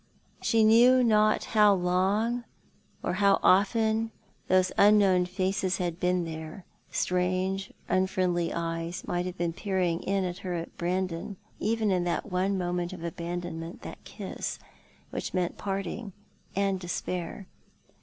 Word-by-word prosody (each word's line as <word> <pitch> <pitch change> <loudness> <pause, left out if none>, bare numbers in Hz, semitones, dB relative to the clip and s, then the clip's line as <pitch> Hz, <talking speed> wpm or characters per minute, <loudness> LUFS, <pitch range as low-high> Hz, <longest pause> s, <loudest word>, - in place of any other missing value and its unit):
She 225 -1 +3
knew 245 +4 +6
not 215 -2 +3
how 210 -2 +4
long 195 +7 +1 0.6
or 175 - -1
how 200 -1 +5
often 220 +3 +3 0.4
those 185 0 +3
unknown 200 -3 +5
faces 190 0 -1
had 175 -2 -3
been 180 -1 +1
there. 160 +2 -7 0.2
Strange 185 +2 -1 0.2
unfriendly 185 -2 +1
eyes 165 +1 -3
might 175 +1 -1
have 180 0 -6
been 170 -1 -1
peering 180 -3 0
in 195 0 0
at 180 -1 -3
her 180 -2 -4
and 165 -1 -6
Brandon, 180 +2 -2 0.2
even 220 -1 +1
in 180 -2 +1
that 175 +3 -2
one 190 +2 +1
moment 175 0 -2
of 175 -2 -8
abandonment, 170 -1 -5
that - - -9
kiss, - - -5 0.5
which - - -4
meant 180 -1 -1
parting 195 +1 -4 0.4
and 195 -1 +1
despair. 180 +1 -4
185 Hz, 135 wpm, -28 LUFS, 175-200 Hz, 0.6 s, knew